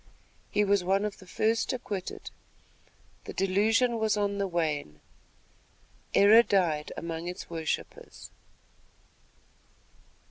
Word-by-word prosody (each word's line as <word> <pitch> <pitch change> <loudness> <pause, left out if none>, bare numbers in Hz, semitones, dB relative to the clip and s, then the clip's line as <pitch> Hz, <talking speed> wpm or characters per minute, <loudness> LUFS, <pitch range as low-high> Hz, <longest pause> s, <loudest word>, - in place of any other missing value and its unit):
He 210 - +2
was 200 -2 +2
one 195 +3 +1
of 210 - -5
the 190 - -15
first 225 +4 0
acquitted. 205 -7 -6 0.9
The - - -7
delusion 225 +5 +2
was 215 -1 +1
on 200 -1 -1
the 200 - 0
wane. 155 - -2 1.2
"Error 210 +3 +8
died 170 -9 0
among 165 0 -5
its 180 -1 -7
worshippers." 160 -2 -5
195 Hz, 105 wpm, -28 LUFS, 170-210 Hz, 1.2 s, Error